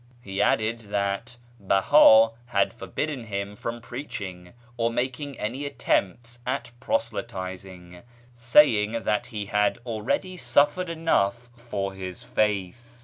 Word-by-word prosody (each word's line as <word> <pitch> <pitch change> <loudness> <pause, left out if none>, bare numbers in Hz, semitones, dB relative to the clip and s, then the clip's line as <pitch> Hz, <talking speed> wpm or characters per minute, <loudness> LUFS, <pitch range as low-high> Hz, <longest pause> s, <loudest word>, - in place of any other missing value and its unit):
He 100 -4 -4
added 110 +2 +2
that 100 +5 -2 0.2
Beha 110 +3 +6 0.2
had 100 -5 +1
forbidden 125 +7 -4
him 100 -1 -4
from 115 +3 -5
preaching, 105 -9 -7 0.2
or 115 -1 +1
making 130 +3 -3
any 125 +7 -3
attempts 120 -3 -1
at 125 -1 -3
proselytising, 95 - -4 0.3
saying 115 -3 +4
that 105 - 0
he 105 -4 -5
had 105 +2 +1
already 120 - -2
suffered 165 +3 +2
enough 120 -8 0
for 105 -5 -4
his 95 +4 -7
faith. 110 0 -2
115 Hz, 115 wpm, -26 LUFS, 100-125 Hz, 0.3 s, Beha